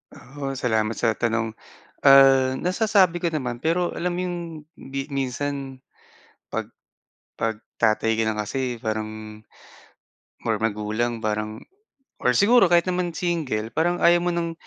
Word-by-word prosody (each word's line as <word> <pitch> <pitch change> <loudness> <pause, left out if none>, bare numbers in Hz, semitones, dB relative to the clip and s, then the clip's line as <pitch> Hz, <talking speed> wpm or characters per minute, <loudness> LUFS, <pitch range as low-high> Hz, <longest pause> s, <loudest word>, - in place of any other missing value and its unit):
Oo, 135 +1 -6
salamat 110 -4 0
sa 115 - +1
tanong. 115 0 -1 0.5
Ah, 135 -1 +6
nasasabi 185 -2 +2
ko 170 - +1
naman 125 -6 -4
pero 175 +2 0
alam 175 0 -2
mo - - 0
yung 175 -1 -3 0.4
bi 135 +1 -6
minsan 135 0 -3 0.7
pag, - - -4 0.7
pag 110 -1 -2 0.2
tatay 110 0 +2
ka 110 0 +1
na 110 - -1
kasi 125 +4 -2
parang, 110 -1 -5 1.1
or - - +2
magulang 110 +2 -2
parang 110 0 -3 0.6
or 125 - +3
siguro 225 - +5
kahit 170 -1 +5
naman 180 -1 -1
single 155 -12 -2
parang 175 +2 +1
ayaw 175 0 +5
mo 175 - +1
ng 170 -1 -2
130 Hz, 135 wpm, -24 LUFS, 110-170 Hz, 1.1 s, Ah